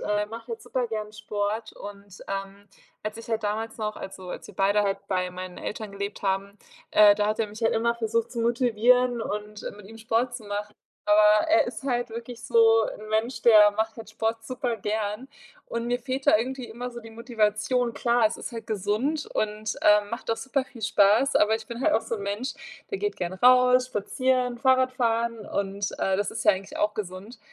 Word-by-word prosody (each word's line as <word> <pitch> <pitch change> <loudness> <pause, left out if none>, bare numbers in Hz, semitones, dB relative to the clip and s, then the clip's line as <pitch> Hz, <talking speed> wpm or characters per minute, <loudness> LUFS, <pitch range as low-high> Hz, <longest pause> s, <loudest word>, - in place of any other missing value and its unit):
äh, 210 0 0
macht 225 +2 -9
halt 450 -1 -6
super 255 - -2
gern 215 -2 -5
Sport. 210 +1 -3
Und, 200 -1 -11
ähm, 195 +1 -5 0.3
als 215 +1 -4
ich 230 - -10
halt 225 -1 -1
damals 220 +2 -2
noch 215 -1 -3
also, 190 -1 -8
als - - -7
wir - - -13
beide 200 +2 +3
halt 195 -1 0
bei 185 -1 0
meinen 180 0 -8
Eltern 215 -1 -5
gelebt 200 +1 -5
haben, 195 +1 -1 0.4
äh, 205 -1 +7
da 205 0 +1
hat 215 +2 0
er 220 - 0
mich 210 +1 -11
halt 225 - +3
immer 235 +1 +1
versucht 230 0 -1
zu 240 - -6
motivieren 240 +1 +3
und 210 -1 -5
mit 210 -2 -13
ihm 225 +1 -12
Sport 230 +2 0
zu 230 - -11
machen. 205 +1 -5 0.3
Aber 210 0 +5
er 330 +1 +4
ist 255 - -7
halt 245 -3 -1
wirklich 230 0 -8
so 225 -1 +5
'n 215 - -8
Mensch, 220 +4 -1
der 215 -3 +7
macht 220 +2 -2
halt 225 -2 -10
Sport 225 +1 -2
super 250 -1 -2
gern 210 +2 -3 0.4
und 235 0 -4
mir 245 +1 0
fehlt 260 +2 -4
da - - +7
irgendwie 255 +3 -3
immer 245 +2 -6
so 240 -1 -8
die 225 - -11
Motivation. 230 +1 0
Klar, 235 -2 +3
es 215 - -3
ist - - -7
halt 230 -1 -7
gesund 220 +9 -1
und, 215 0 -2
ähm, 210 0 +4
macht 235 0 -4
auch 225 - +1
super 270 +1 -1
viel 235 -4 -13
Spaß, 215 +6 +4
aber 215 +1 +4
ich 220 0 -5
bin 235 +1 -7
halt 310 +3 +3
auch 225 - +2
so 230 - -3
'n 205 - -7
Mensch, 205 +7 -3 0.4
der 400 - -2
geht 415 +1 -2
gern 175 -1 -3
raus, 250 +4 +5
spazieren, 255 +2 0
Fahrradfahren 235 -4 +1
und, 200 0 -2
äh, 190 0 +1
das 205 - -1
ist 230 - -5
ja 210 - +7
eigentlich 190 0 -6
auch 210 0 +1
gesund. 200 +3 -7
220 Hz, 210 wpm, -26 LUFS, 210-240 Hz, 0.4 s, äh